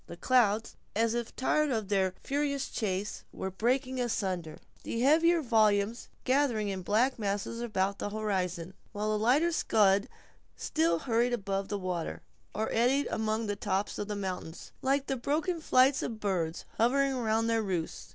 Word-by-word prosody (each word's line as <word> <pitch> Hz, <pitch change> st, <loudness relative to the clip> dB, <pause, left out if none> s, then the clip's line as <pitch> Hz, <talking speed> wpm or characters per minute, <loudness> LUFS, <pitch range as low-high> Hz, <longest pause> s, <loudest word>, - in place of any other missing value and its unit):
The 170 Hz, -, -9 dB
clouds, 225 Hz, -1 st, +2 dB, 0.2 s
as 225 Hz, +1 st, +2 dB
if 235 Hz, -1 st, -3 dB
tired 300 Hz, +3 st, +1 dB
of 220 Hz, -6 st, -1 dB
their 190 Hz, -2 st, +1 dB
furious 280 Hz, -1 st, -1 dB
chase, 200 Hz, -1 st, -3 dB
were 190 Hz, -, -5 dB
breaking 255 Hz, +5 st, 0 dB
asunder; 185 Hz, -9 st, -2 dB, 0.2 s
the 230 Hz, -, -4 dB
heavier 325 Hz, +5 st, +4 dB
volumes, 220 Hz, -1 st, +2 dB
gathering 255 Hz, -6 st, +1 dB
in 190 Hz, -1 st, -3 dB
black 235 Hz, +7 st, +1 dB
masses 205 Hz, +3 st, -2 dB
about 200 Hz, -4 st, -1 dB
the -, -, -2 dB
horizon, 190 Hz, -4 st, -2 dB, 0.2 s
while 210 Hz, +1 st, -1 dB
the 215 Hz, -, 0 dB
lighter 290 Hz, +9 st, +4 dB
scud 205 Hz, -, +3 dB, 0.5 s
still 165 Hz, +1 st, +1 dB
hurried 235 Hz, +5 st, +1 dB
above 195 Hz, -3 st, -2 dB
the 205 Hz, -, -2 dB
water, 180 Hz, -3 st, -4 dB, 0.3 s
or 220 Hz, +1 st, -1 dB
eddied 255 Hz, +5 st, +2 dB
among 220 Hz, +1 st, -1 dB
the 205 Hz, -1 st, -2 dB
tops 200 Hz, 0 st, -2 dB
of 205 Hz, -, -3 dB
the 210 Hz, -, -3 dB
mountains, 185 Hz, -4 st, -5 dB
like 275 Hz, +1 st, +1 dB, 0.2 s
broken 320 Hz, +5 st, -1 dB
flights 265 Hz, -2 st, +4 dB
of 225 Hz, -2 st, -4 dB
birds, 180 Hz, -5 st, -2 dB
hovering 270 Hz, +4 st, +3 dB
around 225 Hz, -3 st, 0 dB
their 230 Hz, 0 st, +2 dB
roosts. 180 Hz, -6 st, -3 dB
220 Hz, 160 wpm, -30 LUFS, 195-255 Hz, 0.5 s, heavier